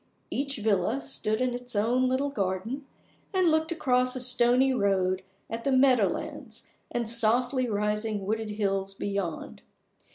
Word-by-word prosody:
Each 275 0 -1
villa 220 +4 +1
stood 220 -5 -1
in 255 -1 +1
its 245 -1 -5
own 245 +5 +2
little 275 +2 0
garden, 215 +6 -3 0.5
and 365 -3 +4
looked 315 +1 +1
across 255 -5 +1
a - - -3
stony 250 +1 +4
road 190 -4 +1 0.3
at 230 +1 -5
the 275 - +1
meadow 255 -5 +5
lands - - -6 0.2
and 235 -2 -2
softly 240 +3 +2
rising 210 0 -1
wooded 220 +1 -2
hills 195 -2 -2
beyond. 195 -5 -4
235 Hz, 140 wpm, -27 LUFS, 205-255 Hz, 0.5 s, meadow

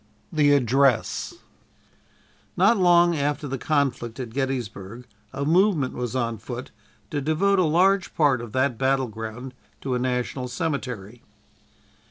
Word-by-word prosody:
'" - - -25
THE 145 -2 +4
ADDRESS 135 -1 +1 1.2
Not 200 +6 +4
long 175 -1 +5
after 145 0 -1
the 135 -1 -4
conflict 135 -5 -1
at 120 -3 -5
Gettysburg 125 -4 -4 0.3
a 140 +1 -3
movement 170 -4 +2
was 125 0 -4
on 115 -3 -1
foot 120 +4 -7 0.4
to 145 - -2
devote 185 +7 +2
a 180 - +3
large 185 +4 +2
part 140 -6 +3
of 120 -2 -8
that 130 -3 0
battle 135 -1 +1
ground 115 +4 -7 0.3
to 135 - -2
a 125 - 0
national 125 +1 -2
cemetery. 125 - -4
135 Hz, 140 wpm, -24 LUFS, 125-155 Hz, 1.2 s, long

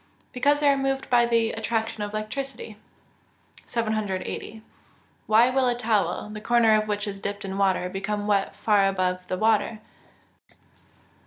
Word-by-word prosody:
_ - - -40
Because 285 +3 +2
they 290 - +3
are 280 - +5
moved 270 -1 -2
by 240 -1 +5
the 230 -1 +2
attraction 225 -1 -2
of 205 0 -3
electricity. 220 +2 -5 0.9
780. 215 -1 -3 0.7
_Why 235 +4 +5
will 265 -1 +2
a 245 - +1
towel, 220 -3 0
the 210 - -7
corner 235 -1 +4
of 215 0 +2
which 210 0 -2
is 200 -1 -6
dipped 200 +1 -5
in 190 0 -5
water, 190 -2 +2
become 205 +2 -3
wet 200 -2 0
far 205 -3 +3
above 185 -1 0
the 185 - -2
water? 220 +1 +1
215 Hz, 155 wpm, -25 LUFS, 205-235 Hz, 0.9 s, are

